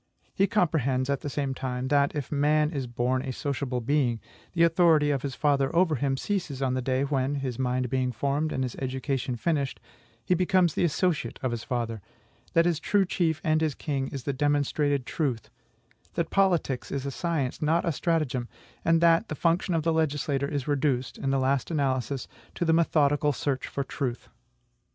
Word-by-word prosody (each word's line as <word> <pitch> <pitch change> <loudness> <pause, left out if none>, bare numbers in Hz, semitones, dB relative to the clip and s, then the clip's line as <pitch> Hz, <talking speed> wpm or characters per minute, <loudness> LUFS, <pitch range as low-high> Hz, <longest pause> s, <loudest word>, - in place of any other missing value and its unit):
He 195 - +2
comprehends, 140 - +1
at 140 - 0
the 145 - -4
same 140 -1 -2
time, 130 -1 -3
that, 140 0 +2
if 145 -4 -4
man 150 +1 +2
is 135 -5 -3
born 120 +2 0
a 135 -1 -4
sociable 135 -1 -2
being, 120 -2 +1 0.3
the 170 -1 +3
authority 165 -3 +4
of 140 -2 0
his 135 -1 -4
father 140 -3 +2
over 170 -2 +4
him 135 -1 0
ceases 165 -7 -2
on 130 -2 0
the 130 - -1
day 130 +1 0
when, 140 0 0
his 130 -4 -3
mind 125 0 0
being 130 0 0
formed 140 +6 -1
and 130 - -1
his 125 - -4
education 130 -1 -2
finished, 140 +1 -1 0.5
he - - +3
becomes 180 -1 +3
the - - 0
associate 175 0 0
of 130 - 0
his 120 -1 -4
father; 115 -3 -3 0.5
that 165 0 +4
his 175 -3 +1
true 200 -2 +2
chief 170 -3 0
and 155 -1 +2
his 155 -4 0
king 140 -3 -2
is 135 -2 -6
the 140 - -2
demonstrated 145 -1 +1
truth; 130 -8 -2 0.6
that 165 -1 -1
politics 175 -9 +1
is 140 -1 -3
a 140 - -2
science, 155 -4 -2
not 160 +4 +2
a 170 - +1
stratagem; 150 -7 -1 0.4
and 165 0 +3
that 165 0 +4
the 155 - -4
function 170 +2 +1
of 160 - 0
the 165 0 +2
legislator 145 -3 0
is 145 -2 -3
reduced, 135 -3 0
in 135 - -1
the 135 - +2
last 130 0 +1
analysis, 135 -4 -1 0.3
to 175 - -1
the 160 - +3
methodical 150 -3 +3
search 135 0 -2
for 140 - -3
truth. 130 -2 -4
140 Hz, 190 wpm, -27 LUFS, 130-160 Hz, 0.6 s, authority